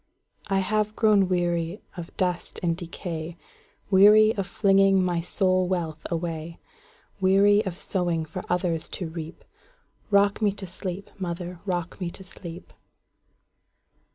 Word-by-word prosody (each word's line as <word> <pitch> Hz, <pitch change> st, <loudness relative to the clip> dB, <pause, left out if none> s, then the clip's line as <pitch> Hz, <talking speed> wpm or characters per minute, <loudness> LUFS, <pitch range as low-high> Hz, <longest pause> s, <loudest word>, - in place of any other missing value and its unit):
I 195 Hz, -, +1 dB
have 215 Hz, +2 st, 0 dB
grown 210 Hz, -4 st, +4 dB
weary 175 Hz, +1 st, 0 dB, 0.2 s
of 175 Hz, -2 st, -9 dB
dust 180 Hz, -2 st, -2 dB
and 170 Hz, -1 st, +1 dB
decay,—Weary 185 Hz, +5 st, +2 dB
of 195 Hz, -2 st, -2 dB
flinging 195 Hz, -2 st, +4 dB
my 175 Hz, -2 st, 0 dB
soul 185 Hz, +1 st, +1 dB
wealth 165 Hz, -4 st, -3 dB
away; 165 Hz, -1 st, -4 dB, 0.6 s
Weary 200 Hz, +2 st, +5 dB
of 175 Hz, -2 st, -4 dB
sowing 175 Hz, -5 st, 0 dB
for 175 Hz, +4 st, -7 dB
others 175 Hz, -2 st, -1 dB
to 180 Hz, -, -4 dB
reap;—Rock 200 Hz, -, -3 dB
me 205 Hz, -2 st, +3 dB
to 195 Hz, -1 st, -7 dB
sleep, 185 Hz, +1 st, -6 dB
mother,—rock 175 Hz, 0 st, -4 dB
me 175 Hz, -, -1 dB
to 190 Hz, -, -9 dB
sleep! 175 Hz, -2 st, -10 dB
180 Hz, 120 wpm, -26 LUFS, 170-195 Hz, 0.6 s, Weary